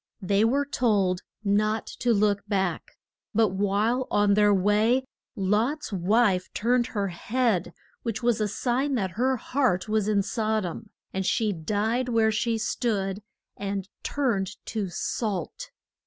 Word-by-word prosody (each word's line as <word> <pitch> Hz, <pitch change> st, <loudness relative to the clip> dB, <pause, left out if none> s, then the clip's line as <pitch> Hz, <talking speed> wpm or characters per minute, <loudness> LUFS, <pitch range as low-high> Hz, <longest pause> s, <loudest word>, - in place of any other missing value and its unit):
They 200 Hz, +3 st, +2 dB
were 275 Hz, +5 st, +2 dB
told 205 Hz, -9 st, +1 dB, 0.2 s
not 215 Hz, +2 st, +1 dB
to 245 Hz, -, +2 dB
look 205 Hz, -2 st, +2 dB
back, 190 Hz, -4 st, -2 dB, 0.4 s
but 220 Hz, -1 st, +4 dB
while 205 Hz, +6 st, 0 dB
on 205 Hz, -1 st, +3 dB
their 205 Hz, 0 st, +4 dB
way 210 Hz, +6 st, +3 dB, 0.3 s
Lot's 215 Hz, +8 st, 0 dB
wife 190 Hz, 0 st, +2 dB
turned 240 Hz, +2 st, +2 dB
her 200 Hz, -5 st, -2 dB
head, 215 Hz, +1 st, 0 dB, 0.3 s
which 230 Hz, 0 st, -4 dB
was 235 Hz, -2 st, +2 dB
a 210 Hz, -, +2 dB
sign 255 Hz, +6 st, 0 dB
that 190 Hz, -6 st, -1 dB
her 255 Hz, +7 st, +1 dB
heart 240 Hz, -8 st, 0 dB
was 215 Hz, -1 st, +1 dB
in 205 Hz, -2 st, +2 dB
Sod 220 Hz, -1 st, -1 dB
om, 205 Hz, +5 st, -6 dB, 0.2 s
and 190 Hz, -, -1 dB
she 215 Hz, +2 st, +1 dB
died 215 Hz, +9 st, -1 dB
where 225 Hz, -2 st, +3 dB
she 225 Hz, +1 st, 0 dB
stood, 210 Hz, -3 st, -1 dB, 0.3 s
and 195 Hz, -1 st, -4 dB
turned 210 Hz, -9 st, -1 dB
to 210 Hz, -4 st, -3 dB
salt. 190 Hz, +1 st, -3 dB
215 Hz, 140 wpm, -26 LUFS, 195-235 Hz, 0.4 s, but